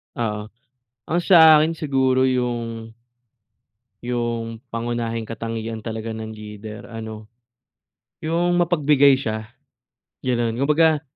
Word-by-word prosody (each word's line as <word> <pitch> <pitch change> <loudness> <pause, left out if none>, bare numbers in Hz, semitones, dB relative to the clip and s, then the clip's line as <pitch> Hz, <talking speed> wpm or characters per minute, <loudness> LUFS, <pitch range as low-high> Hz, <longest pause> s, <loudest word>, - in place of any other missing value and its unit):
Oo. 105 -3 -3 0.6
Ang 175 +2 +1
sa 160 -4 +8
akin 155 +2 +3
siguro 130 -4 +1
yung 115 -3 -2 1.1
yung 120 -2 -3 0.2
pangunahing 115 -1 -2
katangian 115 0 -4
talaga 110 0 -5
ng 110 0 -6
leader 105 0 -9
ano, 110 -1 -8 0.9
yung 175 +2 +1
mapagbigay 150 -5 +4
siya, 110 -4 -3 0.8
gano'n. 120 -3 0
Kumbaga 150 +3 +3
120 Hz, 95 wpm, -22 LUFS, 110-145 Hz, 1.1 s, sa